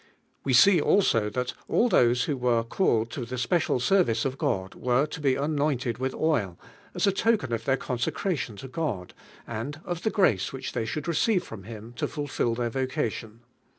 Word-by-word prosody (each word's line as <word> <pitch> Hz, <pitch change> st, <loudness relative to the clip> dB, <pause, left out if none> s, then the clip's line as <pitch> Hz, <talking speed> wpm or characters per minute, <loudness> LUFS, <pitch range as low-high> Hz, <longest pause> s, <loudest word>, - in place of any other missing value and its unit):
We 135 Hz, -, 0 dB
see 180 Hz, +6 st, +7 dB
also 115 Hz, -, +3 dB
thai 125 Hz, +4 st, -2 dB, 0.2 s
all 240 Hz, -, +3 dB
those 125 Hz, -, +3 dB
who 145 Hz, -, -1 dB
were 125 Hz, -3 st, +1 dB
called 115 Hz, -, +1 dB
to 130 Hz, -, -5 dB
tbe 125 Hz, +2 st, -5 dB
special 125 Hz, +2 st, +1 dB
service 125 Hz, -, +2 dB
of 135 Hz, 0 st, -3 dB
God 95 Hz, 0 st, -1 dB
were 125 Hz, +3 st, +1 dB
to 155 Hz, 0 st, -8 dB
be 135 Hz, -3 st, +2 dB
anointed 140 Hz, -5 st, -1 dB
with 130 Hz, 0 st, -1 dB
nil. 120 Hz, -, 0 dB, 0.4 s
as -, -, +1 dB
a 200 Hz, -, +4 dB
token 195 Hz, -, +1 dB
of 115 Hz, 0 st, -3 dB
their 135 Hz, 0 st, +2 dB
con 125 Hz, -2 st, -4 dB
secration 130 Hz, -, -2 dB
to 135 Hz, -, -8 dB
God, 130 Hz, -, -3 dB, 0.3 s
and 115 Hz, +6 st, -5 dB
of 175 Hz, -1 st, -3 dB
the 220 Hz, -, +1 dB
grace 145 Hz, -, +2 dB
which 135 Hz, -, -5 dB
they 115 Hz, -2 st, -1 dB
should 150 Hz, +9 st, -4 dB
receive 180 Hz, +4 st, +2 dB
from 100 Hz, -4 st, -10 dB
ITim 115 Hz, +1 st, -9 dB
to -, -, -1 dB
fulfil 145 Hz, -6 st, -2 dB
their 120 Hz, -1 st, -2 dB
vocation. 115 Hz, -3 st, -3 dB
130 Hz, 190 wpm, -27 LUFS, 115-155 Hz, 0.4 s, see